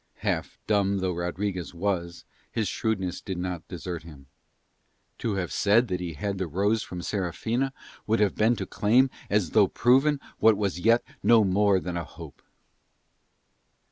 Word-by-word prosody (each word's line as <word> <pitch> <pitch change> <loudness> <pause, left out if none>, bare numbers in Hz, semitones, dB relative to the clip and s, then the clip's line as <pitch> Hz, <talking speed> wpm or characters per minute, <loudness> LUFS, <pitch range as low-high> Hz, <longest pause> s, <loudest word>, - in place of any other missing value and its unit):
Half - - -1
dumb 100 -2 +2
though 95 -1 -1
Rodriguez 90 +1 -3
was 85 -2 -2 0.3
his 110 -3 -1
shrewdness 95 -6 -2
did 95 -2 -5
not 90 -2 -4
desert 90 -1 -5
him. 75 -4 -13 0.9
To 110 -4 -1
have 95 -2 -2
said 110 +4 +3
that 90 -1 -1
he 85 -2 -4
had 100 +6 -3
the 95 - -1
rose 100 +7 +1
from 90 -1 -6
Serafina 110 +9 -1 0.4
would 110 +1 +2
have 105 -2 +3
been 110 +3 +3
to - - -4
claim 125 +5 +3 0.2
as 100 -5 +1
though 105 -3 +5
proven 135 +7 +3 0.2
what 110 -2 +5
was 100 -4 -1
yet 115 +5 +4 0.2
no 115 -2 +5
more 100 0 +3
than 90 -1 -4
a 85 - -2
hope. - - -12
100 Hz, 160 wpm, -27 LUFS, 90-110 Hz, 0.9 s, though